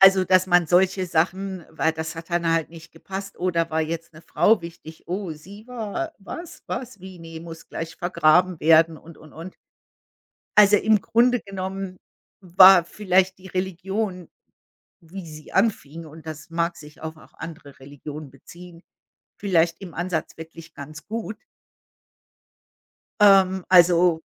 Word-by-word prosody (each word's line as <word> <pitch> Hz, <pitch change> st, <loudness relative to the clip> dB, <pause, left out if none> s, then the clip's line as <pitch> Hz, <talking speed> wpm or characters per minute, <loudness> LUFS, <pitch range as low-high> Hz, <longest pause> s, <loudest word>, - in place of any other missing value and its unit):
Also, 195 Hz, -1 st, +7 dB
dass 185 Hz, 0 st, +3 dB
man 175 Hz, -2 st, +3 dB
solche 185 Hz, +1 st, +2 dB
Sachen 185 Hz, +2 st, -1 dB
weil 160 Hz, -, 0 dB
das 160 Hz, +1 st, -5 dB
hat 165 Hz, +1 st, -10 dB
dann 170 Hz, -1 st, +1 dB
halt 165 Hz, -1 st, 0 dB
nicht 165 Hz, -1 st, -14 dB
gepasst: 195 Hz, +4 st, -8 dB
„Oh, 185 Hz, +1 st, 0 dB
da 165 Hz, -1 st, 0 dB
war 160 Hz, 0 st, 0 dB
jetzt 165 Hz, +2 st, -4 dB
'ne 155 Hz, -, -14 dB
Frau 205 Hz, +4 st, +2 dB
wichtig. 165 Hz, -1 st, -11 dB
Oh, 180 Hz, 0 st, -4 dB
sie 200 Hz, +8 st, -13 dB
war 250 Hz, +7 st, -5 dB
was? 335 Hz, -, -9 dB
Was? 240 Hz, -5 st, -6 dB
Wie? 185 Hz, -1 st, -11 dB
Ne, 165 Hz, -1 st, -10 dB
muss 165 Hz, -1 st, -11 dB
gleich 165 Hz, 0 st, -6 dB
vergraben 175 Hz, 0 st, +2 dB
werden” 160 Hz, +1 st, +4 dB
und, 165 Hz, -1 st, -15 dB
und, 155 Hz, -1 st, -16 dB
und. 170 Hz, +4 st, -10 dB, 1.0 s
Also, 205 Hz, 0 st, +7 dB
im 215 Hz, 0 st, +3 dB
Grunde 245 Hz, +4 st, +2 dB
genommen 190 Hz, -1 st, -6 dB, 0.4 s
war 185 Hz, -1 st, +7 dB
vielleicht 190 Hz, 0 st, +1 dB
die 185 Hz, -, -14 dB
Religion, 190 Hz, 0 st, -4 dB, 0.7 s
wie 175 Hz, +2 st, -10 dB
sie 155 Hz, -1 st, -12 dB
anfing 165 Hz, -7 st, -1 dB
und 155 Hz, +1 st, -14 dB
das 155 Hz, 0 st, -9 dB
mag 170 Hz, +1 st, -1 dB
sich 150 Hz, 0 st, -14 dB
auf 160 Hz, 0 st, -6 dB
auch -, -, -19 dB
andere 155 Hz, -4 st, -10 dB
Religionen 145 Hz, +2 st, -9 dB
beziehen, 170 Hz, +5 st, -14 dB, 0.6 s
vielleicht 170 Hz, -3 st, +1 dB
im 180 Hz, -4 st, -9 dB
Ansatz 175 Hz, -2 st, -3 dB
wirklich 165 Hz, 0 st, -12 dB
ganz 150 Hz, +3 st, -10 dB
gut. 220 Hz, 0 st, -5 dB, 1.9 s
Ähm, 190 Hz, -2 st, +5 dB
also 175 Hz, -2 st, +5 dB
175 Hz, 150 wpm, -23 LUFS, 160-190 Hz, 1.9 s, Also